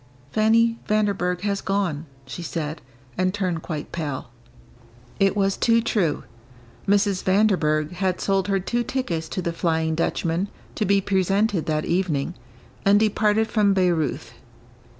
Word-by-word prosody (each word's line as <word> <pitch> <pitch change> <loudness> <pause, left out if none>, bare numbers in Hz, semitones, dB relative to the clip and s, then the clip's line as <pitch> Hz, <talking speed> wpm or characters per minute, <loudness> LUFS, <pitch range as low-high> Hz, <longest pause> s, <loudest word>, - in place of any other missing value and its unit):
"Fanny 230 +3 +3
Vanderburgh 200 -4 0
has 200 -1 -1
gone," 180 -6 -1 0.2
she 135 +6 -7
said, 155 -2 -4 0.4
and 185 0 +2
turned 180 -5 -1
quite 155 -3 -5
pale. 145 -7 -4 0.9
It 195 +1 +3
was 195 -1 +2
too 230 -1 +3
true. 205 -8 0 0.6
Mrs. 200 -1 +2
Vanderburgh 180 -6 +2
had 185 0 -1
sold 195 -1 +1
her 195 -1 +1
two 240 +6 -1
tickets 170 -13 -3
to 185 - -3
the 170 - -2
"Flying 160 -1 0
Dutchman," 165 +3 -1 0.3
to 215 - -1
be 200 0 +3
presented 195 -1 +1
that 155 -1 0
evening, 170 -4 0 0.5
and 200 +1 +5
departed 215 0 +2
from 210 -3 +2
Bayreuth. 160 -10 0
190 Hz, 135 wpm, -23 LUFS, 165-205 Hz, 0.9 s, and